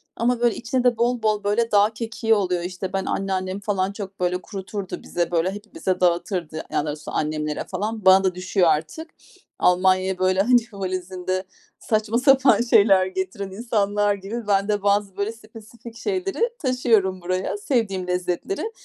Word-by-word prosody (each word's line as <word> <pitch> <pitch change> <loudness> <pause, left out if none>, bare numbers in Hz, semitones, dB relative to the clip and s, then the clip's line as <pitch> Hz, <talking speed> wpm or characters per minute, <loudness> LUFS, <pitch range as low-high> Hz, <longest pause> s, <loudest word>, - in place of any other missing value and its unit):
Ama, 240 +1 +1
böyle, 240 -2 +2
içinde 250 +1 -1
de 245 -2 +3
bol 235 0 0
bol, 210 -1 +1
böyle, 225 +3 +1
dağ 205 +1 +5
kekiği 225 0 -1
oluyor. 180 -4 0
İşte, 185 +1 -5
ben 195 0 -1
anneannem 190 0 -2
falan 195 -2 -1
çok, 200 -1 -8
böyle, 180 0 0
kuruturdu 195 -1 -6
bize, 175 0 -2
böyle, 175 +2 +1
hepimize 205 -3 -4
dağıtırdı, 175 -2 0
yani, 160 - -6
daha 145 - 0
doğrusu 150 0 -5
annemlere 150 0 -2
falan. 210 +2 -4
Bana 190 +1 +7
da 185 -1 +1
düşüyor 185 -1 +1
artık. 160 - -1 0.5
Almanya'ya, 185 +1 +3
böyle, 185 +1 +2
hani, 245 +3 +5
valizinde 185 -1 -3 0.4
saçma 220 +1 0
sapan 265 -1 +5
şeyler 200 -5 +5
getiren 190 +1 -4
insanlar 205 -1 0
gibi 210 +3 -6
ben 200 0 +2
de 205 -1 -1
bazı, 200 -1 +1
böyle, 200 +2 -1
spesifik 225 +1 -13
şeyleri 390 - -2 0.2
taşıyorum 225 - +1
buraya, 185 +3 -2
sevdiğim 205 -6 -1
lezzetleri. 180 - -2
200 Hz, 160 wpm, -23 LUFS, 185-225 Hz, 0.5 s, Bana